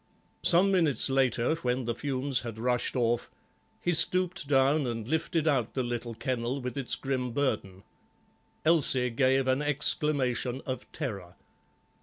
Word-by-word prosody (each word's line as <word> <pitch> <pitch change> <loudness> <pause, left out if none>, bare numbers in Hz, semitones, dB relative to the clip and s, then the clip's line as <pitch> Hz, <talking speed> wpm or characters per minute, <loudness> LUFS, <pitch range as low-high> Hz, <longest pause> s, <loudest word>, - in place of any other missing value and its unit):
Some 185 +3 +5
minutes 155 - +2
later, 130 0 +1
when 125 -4 -2
the 120 - -1
fumes 135 +1 -2
had 115 -2 -7
rushed 125 +3 -1
off, 120 -1 0 0.5
he 175 - -1
stooped 180 0 +3
down 140 +1 +2
and 115 -2 -5
lifted 160 +2 -1
out 130 -7 0
the 130 - -1
little 120 -1 -5
kennel 125 +2 -3
with 125 0 -6
its 135 -3 -1
grim 130 -3 -3
burden. 105 -9 -2 0.8
Elsie 135 -6 +4
gave 130 +2 +1
an 130 +2 +1
exclamation 140 -3 0
of 130 -2 -6
terror. 100 - -6
130 Hz, 140 wpm, -28 LUFS, 120-145 Hz, 0.8 s, Some